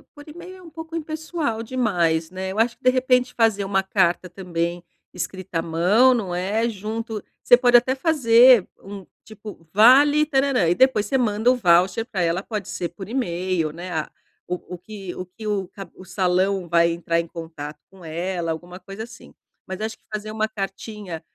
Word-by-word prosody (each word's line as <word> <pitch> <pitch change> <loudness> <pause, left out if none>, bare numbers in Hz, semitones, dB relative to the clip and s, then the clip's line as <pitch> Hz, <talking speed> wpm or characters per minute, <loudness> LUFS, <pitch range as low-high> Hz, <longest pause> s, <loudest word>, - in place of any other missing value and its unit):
por 290 -1 -13
email 350 +4 -10
é - - -15
um 345 - -13
pouco 320 +1 -9
impessoal 310 -6 -3
demais, 180 -10 0
né. 190 0 -5
Eu 200 - -4
acho 230 +1 +1
que, - - -38
de 255 - +5
repente, 255 0 +2
fazer 220 -4 +2
uma 195 0 +1
carta 190 -2 +1
também 175 -1 -4 0.3
escrita 180 -1 -4
à - - 0
mão, 180 +10 +3
não 200 -7 -2
é, 205 +6 0
junto 220 +1 -5 0.2
você 245 - +7
pode 245 -1 +3
até 245 +2 +5
fazer 255 - +5 0.2
um, 195 -1 -9 0.2
tipo: 210 -5 -12
"Vale 280 +8 +6
tarãrã". 270 - +1
E 175 - +2
depois 240 -1 +3
você 265 - +1
manda 225 -1 +2
o - - +2
voucher 185 +1 +3
pra 200 -6 -3
ela, 170 +2 0
pode 210 -2 -5
ser, 175 - -4
por 190 +2 -10
email, 180 - -1
né, 175 +3 -8
a 155 -2 -3 0.4
o 180 0 -5
o - - -10
que 195 0 -9
o 185 - -6
que 190 +5 -12
o 200 -3 -1
cab 195 +1 -11
o 185 - -13
salão 185 0 0
vai 170 0 +3
entrar 170 0 -1
em 170 - -3
contato 160 -3 -8
com 190 -3 -15
ela, 170 +1 -3
alguma 175 +3 -7
coisa 195 +4 -8
assim. 235 - -13 0.3
Mas 190 +2 -6
acho 220 0 -4
que - - -42
fazer 215 0 -5
uma 215 0 -1
cartinha 195 -3 -6
200 Hz, 195 wpm, -22 LUFS, 175-240 Hz, 0.4 s, você